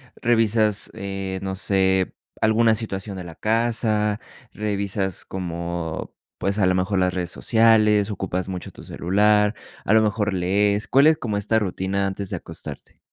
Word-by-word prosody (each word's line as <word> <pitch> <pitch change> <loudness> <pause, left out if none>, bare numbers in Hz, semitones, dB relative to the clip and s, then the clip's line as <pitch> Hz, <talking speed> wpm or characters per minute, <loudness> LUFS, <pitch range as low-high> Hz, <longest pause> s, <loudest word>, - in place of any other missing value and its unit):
revisas, 110 -3 +2
eh, 95 -2 -4
no 95 -1 -4
sé, 95 -1 +1 0.3
alguna 110 +1 +4
situación 100 -3 -5
de 90 - -7
la 85 -2 -9
casa, 110 -2 0 0.3
revisas 100 -2 -2
como, 85 -2 -4 0.2
pues, 100 +2 -1
a 95 - +4
lo 95 - +3
mejor 95 +1 0
las 90 0 +1
redes 90 -1 -3
sociales, 110 -2 +3
ocupas 95 -2 -3
mucho 90 -2 -6
tu - - -13
celular, 105 +3 +2 0.3
a - - -1
lo 110 - +6
mejor 105 -1 0
lees. 100 +3 +1
¿Cuál 140 +3 +5
es 160 0 +5
como 115 -9 -3
esta 105 +2 +1
rutina 95 0 -1
antes 95 0 -4
de - - -3
acostarte? - - -9
100 Hz, 155 wpm, -23 LUFS, 95-110 Hz, 0.3 s, lo